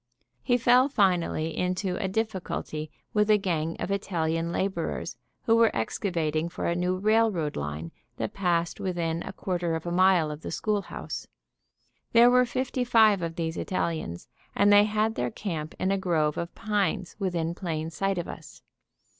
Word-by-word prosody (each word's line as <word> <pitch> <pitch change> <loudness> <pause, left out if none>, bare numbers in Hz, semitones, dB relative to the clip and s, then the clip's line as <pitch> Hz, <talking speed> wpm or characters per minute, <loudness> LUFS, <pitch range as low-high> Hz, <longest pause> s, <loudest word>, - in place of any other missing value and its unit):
He 245 -2 +2
fell 250 +3 +5
finally 175 - +1
into 180 +1 -1
a - - 0
difficulty 190 -7 -3 0.2
with 210 0 +2
a 210 - +6
gang 165 -5 -2
of - - -3
Italian 165 -4 -1
laborers 190 -2 -2 0.3
who 225 - +4
were 230 -1 +5
excavating 160 - -1
for - - -5
a 170 - +1
new 180 +1 0
railroad 210 -6 +2
line 75 +3 -4 0.3
that - - -3
passed 175 -3 0
within 170 -3 -2
a - - -6
quarter 175 -3 -2
of 160 - -5
a 175 - -2
mile 180 -3 +4
of 150 +1 -7
the - - -6
schoolhouse. 210 -2 -3 0.9
There 235 +1 +7
were 250 0 +4
fifty 255 +1 -1
five 220 -5 +5
of 165 -1 -3
these 165 -1 -3
Italians, 160 - -3 0.3
and 205 0 +5
they 205 0 +7
had 215 +1 +1
their 125 - -1
camp 160 - -5
in 190 - 0
a 195 - +1
grove 160 -5 +1
of 170 0 -5
pines 205 -3 -1
within 170 -4 -1
plain 165 -3 -4
sight 195 +4 -1
of 175 - -3
us. 150 -5 -10
180 Hz, 165 wpm, -27 LUFS, 165-205 Hz, 0.9 s, There